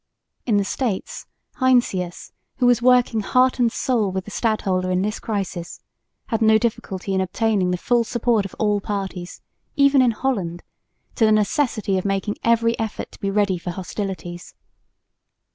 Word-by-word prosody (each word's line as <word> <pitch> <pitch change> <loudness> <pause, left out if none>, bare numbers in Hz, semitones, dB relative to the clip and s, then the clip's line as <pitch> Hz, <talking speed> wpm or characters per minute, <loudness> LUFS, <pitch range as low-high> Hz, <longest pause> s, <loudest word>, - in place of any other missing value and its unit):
In 215 -4 +3
the 200 - +2
States 220 -3 -3 0.3
Heinsius, 240 -9 +1 0.3
who 250 - +1
was 245 -1 +4
working 250 -2 +4
heart 255 +5 +2
and 235 -2 +3
soul 225 -7 0
with 190 0 -3
the 210 - -9
stadholder 195 -5 0
in 185 +1 +1
this 210 +1 -2
crisis, 190 -5 -4 0.5
had 225 0 -1
no 220 0 +6
difficulty 195 -4 -3
in 190 - +1
obtaining 195 0 0
the 180 - 0
full 240 +5 +2
support 230 -2 +1
of 195 - -8
all 210 -2 +1
parties, 190 -3 -5 0.3
even 280 -2 +5
in 250 - +4
Holland, 200 -8 -2 0.5
to 230 - 0
the 215 - +4
necessity 215 -2 +1
of 185 - -7
making 195 +1 -1
every 230 0 +3
effort 220 -1 -4
to - - -15
be 195 - -2
ready 195 -3 +1
for 180 - -6
hostilities. 180 -1 -6
210 Hz, 160 wpm, -22 LUFS, 190-235 Hz, 0.5 s, no